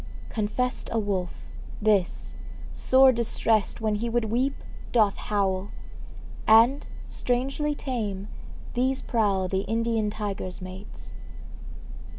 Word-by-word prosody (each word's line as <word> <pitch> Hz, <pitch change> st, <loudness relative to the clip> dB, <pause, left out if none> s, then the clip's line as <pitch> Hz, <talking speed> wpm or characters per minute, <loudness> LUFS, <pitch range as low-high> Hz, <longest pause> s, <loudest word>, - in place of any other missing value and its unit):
Confessed 235 Hz, +4 st, -1 dB
A 230 Hz, -, 0 dB
wolf, 195 Hz, -5 st, -2 dB, 0.4 s
this, 205 Hz, -4 st, +1 dB, 0.4 s
sore 260 Hz, 0 st, +6 dB
distressed 225 Hz, -2 st, +1 dB
When 215 Hz, -1 st, +1 dB
he 225 Hz, +3 st, -1 dB
would 235 Hz, 0 st, +1 dB
weep, 260 Hz, +4 st, +1 dB, 0.4 s
doth 215 Hz, -4 st, +4 dB
howl; 195 Hz, -2 st, -1 dB, 0.8 s
And, 230 Hz, +6 st, +6 dB, 0.2 s
strangely 270 Hz, +4 st, -1 dB
tame, 210 Hz, -9 st, -3 dB, 0.5 s
these 260 Hz, +2 st, 0 dB
prowl 200 Hz, -6 st, +1 dB
The 190 Hz, +1 st, 0 dB
Indian 225 Hz, 0 st, 0 dB
tiger's 205 Hz, -3 st, -4 dB
mates. 185 Hz, +2 st, -9 dB
220 Hz, 105 wpm, -26 LUFS, 200-245 Hz, 0.8 s, sore